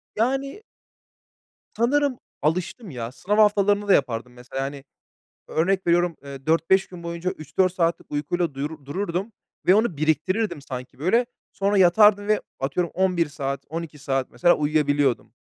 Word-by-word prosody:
Yani 270 - -1 1.1
Sanırım 270 +3 +2 0.2
alıştım 180 - -1
ya, 120 -3 -5
sınav 205 +10 -2
haftalarını 205 -1 +3
da 195 - +6
yapardım 125 -2 0
mesela, 125 +2 -6
hani, 140 0 -6 0.7
örnek 185 +4 0
veriyorum, 175 0 +2
eee, 135 -1 -9
4-5 165 +4 +3
gün 180 -2 -11
boyunca 170 +1 -3
3-4 185 +4 0
saatlik 170 -2 -1
uykuyla 155 +1 -1
duyur 145 +1 -5
dururdum 185 +6 -3 0.3
ve 185 - +7
onu 215 -5 +2
biriktirirdim 160 +4 0
sanki 125 -2 -8
böyle. 230 - +2 0.3
Sonra 200 0 +1
yatardım 205 +3 +5
ve 215 - +3 0.2
atıyorum 150 +6 -1
11 180 -3 +1
saat, 140 -1 -4
12 160 -1 -6
saat 135 -1 -2
mesela 175 0 +4
uyuyabiliyordum. 145 -3 +1
170 Hz, 140 wpm, -24 LUFS, 145-200 Hz, 1.1 s, ve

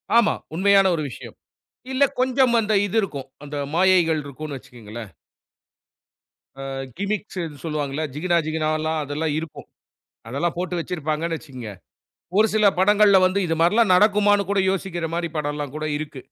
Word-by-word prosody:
ஆமா 235 -2 +5 0.2
உண்மையான 195 +1 +4
ஒரு 155 - -3
விஷயம். - - -10 0.6
இல்ல 275 +2 +4 0.2
கொஞ்சம் 255 -2 +3
அந்த 215 0 -1
இது 205 +3 -4
இருக்கும். 140 -10 -5 0.2
அந்த 145 0 -7 0.2
மாயைகள் 175 -3 +3
இருக்குன்னு 140 +1 -7
வச்சிக்கோங்களேன். 115 -3 -10 1.5
ஆ - - -5 0.3
கிமிக்ஸ்ன்னு 190 -7 -4
சொல்லுவாங்கள்ல, 150 -1 -2
ஜிகினா 170 +2 +1
ஜிகினாவல்லாம் 155 0 -1
அதெல்லாம் 150 +2 -2
இருக்கும். 160 -2 -9 0.6
அதெல்லாம் 155 +8 -2
போட்டு 180 -1 -2
வெச்சிருப்பாங்கண்ணு 165 0 -2
வச்சிக்கோங்க. 130 -8 -9 0.7
ஒரு 220 - +5
சில 215 -1 +3
படங்கள்ல 205 0 +5
வந்து 185 +2 +1
இது 165 - 0
மாரில்லாம் 195 +3 +4
நடக்குமான்னு 205 0 +4
கூட 200 -1 +2
யோசிக்கிற 175 -3 -3
மாரி 170 -1 -2
படம்ல்லாம் 145 -1 -3
கூட 155 0 -3
இருக்கு. 145 -4 -7
165 Hz, 135 wpm, -23 LUFS, 150-200 Hz, 1.5 s, ஆமா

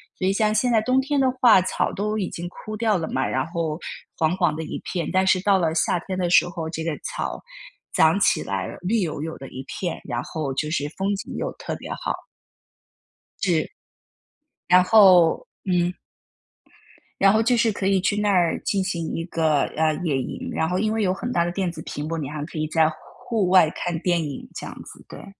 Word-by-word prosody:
所 185 - -1
以 190 - +3
像 215 +1 +1
现 245 +3 +2
在 225 - +4
冬 255 +4 +2
天 285 +1 0
的 270 - +3 0.2
话 235 -6 +8
草 185 - -1
都 210 +2 -2
已 190 - -2
经 175 +1 -6
枯 215 +4 -8
掉 220 -2 +2
了 160 - -3
嘛， 130 - 0
然 130 +3 -1
后 165 -2 -3 0.4
黄 160 +3 +1
黄 175 -5 +2
的 160 - -4
一 - - -5
片， 175 -3 -3
但 185 0 +2
是 185 -1 +3
到 200 0 +4
了 165 -3 +1
夏 170 +2 +1
天 190 -1 -3
的 175 -1 0
时 175 - +5
候， 165 -2 -5
这 160 0 -4
个 165 - -1
草 - - -4 0.5
长 160 +5 +4
起 - - +3
来 95 -1 -3
了， - - -8
绿 210 +6 +1
油 155 -6 -2
油 160 0 -5
的 135 - -8
一 130 +1 -8
片， 175 -3 -4
然 120 -3 -2
后 145 -1 -4
就 150 +3 -2
是 145 -2 -1
风 200 +1 0
景 200 - -7
又 - - -2
特 - - -5
别 - - -9
好。 - - -4 1.2
是。 175 -5 +1 1.0
然 180 +1 +6
后 185 -5 +6 0.2
嗯。 180 -1 +1 1.3
然 195 0 +6
后 220 - +3
就 240 +2 +3
是 230 -1 +3
可 200 -2 -4
以 195 -1 +3
去 205 +2 0
那 210 0 +1
儿 175 -3 +2
进 195 -2 0
行 170 -4 -3
一 165 - -2
个， 160 -4 +1 0.2
呃， 155 0 +3
野 150 -6 +1
营。 - - -6
然 160 - 0
后 180 +2 -1
因 215 +1 0
为 220 - 0
有 185 -3 +2
很 240 +6 -4
大 170 -5 +2
的 175 - -2
电 185 -1 -1
子 160 -2 -9
屏 145 +1 -5
幕， 165 +1 -3
你 145 -4 -4
还 150 0 -5
可 165 - -9
以 155 - -1
在 160 0 +3
户 160 - -9 0.3
户 215 -6 +1
外 180 -4 +6
看 175 0 -3
电 175 -1 +1
影， 145 -3 -6
这 - - -7
样 - - -7
子， - - -13
对。 - - -10
180 Hz, 245 characters per minute, -23 LUFS, 160-200 Hz, 1.3 s, 话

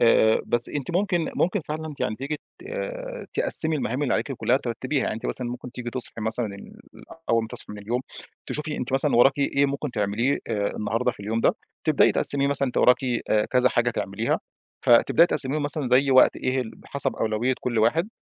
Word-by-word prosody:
آآ 110 -1 +4
بس 120 0 +3
أنتِ 145 +2 -4
ممكن 175 -2 0
ممكن 185 +4 +1
فعلًا 155 0 -4
ت - - -18
يعني 110 - -1
تيجي 140 +5 -4 0.2
ت 355 - -15 0.7
تِقَسِمي 160 -1 0
المهام 135 0 -2
اللي 135 - +1
عليكِ 140 - -1
كلّها 125 0 +1
ترتّبيها، 130 +3 -2
يعني - - -1
أنتِ 115 - -6
مثلًا 125 - -3
ممكن 125 0 -8
تيجي 120 -1 -6
تصحي 120 -2 -5
مثلًا 110 +2 -1
ال 100 - -12 0.6
أول 115 -1 +3
ما 110 - -6
تصحي - - -3
من 105 - -8
اليوم، 115 +5 -2 0.5
تشوفي 150 0 -1
أنتِ 130 +1 -4
مثلًا 135 0 +2
وراكِ 135 +4 +5
إيه 140 0 +2
ممكن 140 +1 -3
تعمليه 115 +5 0
آآ 105 -3 -1
النهارده 115 +4 -1
في - - -15
اليوم 110 +3 -2
ده، - - +3 0.3
تبدأي - - +4
تقَسِمي 140 0 +4
مثلًا 140 -1 +1
أنتِ - - -8
وراكِ 125 +1 +4 0.3
آآ 105 0 +3
كذا 125 0 +3
حاجة 120 0 +1
تعمليها، 110 0 -2 0.5
فتبدأي 140 +7 +6
تقَسِميهم 145 -2 -2
مثلًا 145 -1 -1
زي 130 +3 +3
وقت 130 -1 +6
إيه 130 +1 -1
ال 115 -3 -5
بحسب 140 - -3
أولوية 110 +4 0
كلّ 120 -2 -1
واحد، 155 - +2
125 Hz, 200 wpm, -24 LUFS, 115-140 Hz, 0.7 s, فتبدأي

